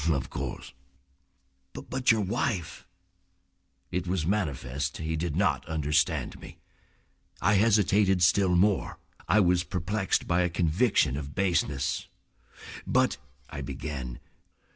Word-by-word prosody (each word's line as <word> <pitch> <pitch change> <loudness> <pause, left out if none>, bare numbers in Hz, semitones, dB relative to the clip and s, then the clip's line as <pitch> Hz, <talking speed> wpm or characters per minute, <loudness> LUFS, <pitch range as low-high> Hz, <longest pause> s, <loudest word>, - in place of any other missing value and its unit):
"Of 70 -4 -1
course." - - -6 1.0
"But 130 -2 0
your 110 -1 +2
wife—?" 90 -3 -2 1.1
It 90 0 -2
was 90 -3 -1
manifest 70 -8 -2
he 80 0 -3
did 80 -1 -2
not 80 -7 +1
understand 75 0 0
me. - - -12 0.8
I 100 +4 +3
hesitated 100 -3 +3
still 90 +1 +4
more. 100 +2 +2 0.3
I 110 - +4
was 90 -2 +3
perplexed 95 +2 -1
by 85 +1 +2
a 90 - +1
conviction 85 - +2
of 70 -1 -7
baseness. 80 -8 0 0.8
"But—" - - +2 0.3
I 75 -3 -5
began. 65 -2 -6
85 Hz, 115 wpm, -28 LUFS, 75-100 Hz, 1.1 s, still